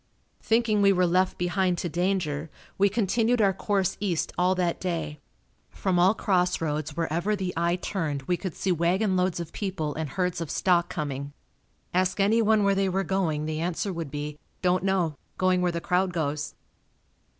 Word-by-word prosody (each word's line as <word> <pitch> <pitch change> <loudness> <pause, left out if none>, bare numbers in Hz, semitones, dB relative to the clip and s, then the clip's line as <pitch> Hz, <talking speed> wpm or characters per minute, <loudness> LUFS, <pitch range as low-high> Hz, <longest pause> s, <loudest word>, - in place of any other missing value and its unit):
Thinking 225 -2 +2
we 200 0 +6
were 180 -1 +3
left 185 +2 +2
behind 180 0 +1
to 175 - -2
danger, 170 -3 -1 0.3
we 200 +1 +3
continued 230 +3 +1
our 200 -3 +4
course 195 -1 0
east 185 -5 -1
all 180 +1 +2
that 175 -2 0
day. 160 -5 -3 0.5
From 185 -3 0
all 185 +5 +5
cross 180 -4 +1
roads 155 -1 -3
wherever 170 +5 0
the 190 -2 -3
eye 170 +1 +1
turned 160 -7 -3
we 180 +6 0
could 180 -1 -5
see 190 - -1
wagon 180 +4 +1
loads 180 -1 +1
of 170 -2 -6
people 180 -7 -3
and 160 -2 -4
herds 180 +2 -1
of 165 - -4
stock 175 0 +2
coming. 145 -4 -4 0.6
Ask 185 +2 +1
anyone 215 +1 +4
where 200 0 +4
they 195 0 +1
were 190 +1 0
going, 170 -6 0
the 155 0 -3
answer 180 +3 -2
would 165 -4 -4
be, 150 +1 -5 0.2
"Don't 180 0 +2
know. 190 -5 +1 0.2
Going 185 -1 +2
where 180 -1 +2
the 170 - -2
crowd 180 0 +1
goes." 150 -3 -2
180 Hz, 180 wpm, -26 LUFS, 165-195 Hz, 0.6 s, we